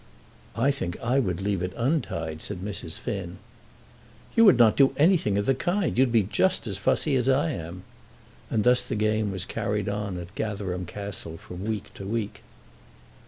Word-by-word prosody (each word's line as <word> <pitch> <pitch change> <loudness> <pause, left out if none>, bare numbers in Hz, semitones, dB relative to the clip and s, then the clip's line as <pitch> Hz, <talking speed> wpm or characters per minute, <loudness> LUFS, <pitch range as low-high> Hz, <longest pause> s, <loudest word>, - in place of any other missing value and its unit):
"I 125 +6 +3
think 95 -11 -4
I 125 +4 +1
would 95 -7 -1
leave 100 -2 0
it 90 +1 -3
untied," 115 - -1
said 95 -3 -4
Mrs. 95 -5 -5
Finn. 90 -4 -5 1.0
"You 230 - +7
would 200 - +7
not 115 -3 +6
do 135 -1 +4
anything 155 - +3
of 100 - 0
the 135 - +4
kind. 175 +7 0
You'd 130 0 +3
be 115 -3 +4
just 185 - +1
as - - -3
fussy 150 -3 +1
as 130 0 +2
I 145 +5 +3
am." 85 - -6 0.7
And 110 - +1
thus 125 0 +5
the 125 - -4
game 110 -1 +1
was 95 -1 -2
carried 105 -1 -2
on 100 -2 -2
at 85 +1 -8
Gatherum 95 -4 -3
Castle 100 -4 -6
from 90 +3 -8
week 110 -2 -4
to 95 - -8
week. 110 -1 -3
105 Hz, 180 wpm, -26 LUFS, 95-130 Hz, 1.0 s, You